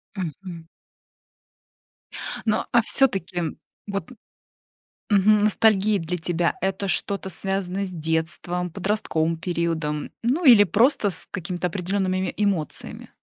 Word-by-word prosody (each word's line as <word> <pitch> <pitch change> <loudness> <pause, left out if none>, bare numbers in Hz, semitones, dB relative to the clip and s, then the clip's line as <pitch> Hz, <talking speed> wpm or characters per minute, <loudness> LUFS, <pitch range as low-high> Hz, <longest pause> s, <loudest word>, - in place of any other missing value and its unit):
Мгм. 170 -1 -6 1.8
Ну, 215 -1 +1
а 235 - +5
всё-таки, 190 - 0 0.3
вот 200 +5 -4 1.0
мгм, 205 0 +4
ностальгия 215 -1 +3
для 170 +1 -3
тебя- 170 0 0
это 190 +1 -1
что-то 195 0 -1
связанное 195 +1 -1
с 185 - -4
детством, 170 +2 -2
подростковым 170 -4 -1
периодом, 165 -3 -2
ну, 265 +9 +1
или 235 -6 +9
просто 215 - +3
с 170 - -1
какими-то 180 -1 -3
определенными 185 +1 -1
эмоциями? 195 -7 -2
190 Hz, 105 wpm, -24 LUFS, 170-205 Hz, 1.8 s, или